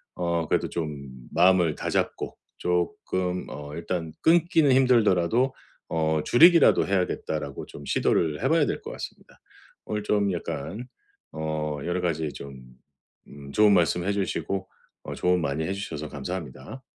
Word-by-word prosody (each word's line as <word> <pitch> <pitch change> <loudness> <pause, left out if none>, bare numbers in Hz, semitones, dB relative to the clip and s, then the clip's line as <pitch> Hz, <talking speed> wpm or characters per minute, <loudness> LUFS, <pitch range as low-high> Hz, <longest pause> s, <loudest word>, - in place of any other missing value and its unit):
어 85 -2 -1
그래도 - - 0
좀 75 -5 -5 0.2
마음을 90 -2 +4
다잡고 - - -2 0.2
쪼끔 90 +1 -1
어 75 +3 -8
일단 85 -1 -4
'끊기는 165 -3 +4
힘들더라도 120 -1 +3 0.4
어 80 -1 +1
줄이기라도 170 +5 +6
해야겠다.'라고 80 -6 -2
좀 70 - -11
시도를 80 - +1
해 135 - +2
봐야 160 -2 +4
될 - - -3
것 - - -7
같습니다. - - -10 0.5
오늘 105 -1 -3
좀 105 -1 +1
약간 90 - -5 0.5
어 80 -1 -3
여러 90 +1 -1
가지 80 -4 -1
좀 70 -2 -9 0.7
음 70 -1 -11
좋은 105 +6 +5
말씀해 90 +2 +2
주시고 95 0 -2 0.4
어 - - -6
조언 90 0 +1
많이 70 +1 -1
해 95 - -2
주셔서 80 -7 -5
감사합니다. 75 - -7
90 Hz, 295 characters per minute, -26 LUFS, 75-100 Hz, 0.7 s, 줄이기라도